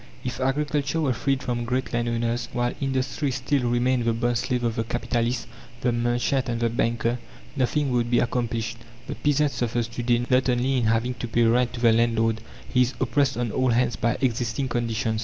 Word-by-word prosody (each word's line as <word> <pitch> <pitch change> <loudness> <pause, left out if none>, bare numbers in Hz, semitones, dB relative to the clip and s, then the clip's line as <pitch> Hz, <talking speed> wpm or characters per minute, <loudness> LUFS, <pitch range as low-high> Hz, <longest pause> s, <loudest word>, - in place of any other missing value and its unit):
If 125 -1 -4
agriculture 145 +3 0
were 140 -5 +1
freed 135 +2 -1
from 120 -2 -2
great 125 +2 -2
landowners, 120 0 -1
while 120 0 0
industry 135 +2 -1
still 130 -1 0
remained 120 +1 +2
the 115 - +2
bond 120 +1 0
slave 125 0 -1
of 115 -1 0
the 115 - 0
capitalist, 120 +1 -1 0.4
the 125 - +2
merchant, 120 +2 0
and 115 -1 -1
the 115 -1 +1
banker, 115 +1 0 0.4
nothing 140 +1 +1
would 120 -1 +1
be 120 - +3
accomplished. 115 -2 -1 0.3
The - - -4
peasant 150 0 +1
suffers 120 -2 -1
to 120 - -5
day 120 0 +2
not 130 0 +3
only 125 +2 +1
in 120 - +1
having 115 +3 +1
to 125 - -5
pay 115 +1 +2
rent 120 +2 +3
to 120 - -6
the 115 -2 +5
landlord; 115 -1 +2 0.3
he 125 - +2
is 125 +1 +1
oppressed 135 +1 +1
on 120 -3 -1
all 130 +2 +1
hands 120 0 +2
by 115 0 0
existing 120 0 0
conditions. 115 -2 -1
120 Hz, 195 wpm, -25 LUFS, 115-130 Hz, 0.4 s, the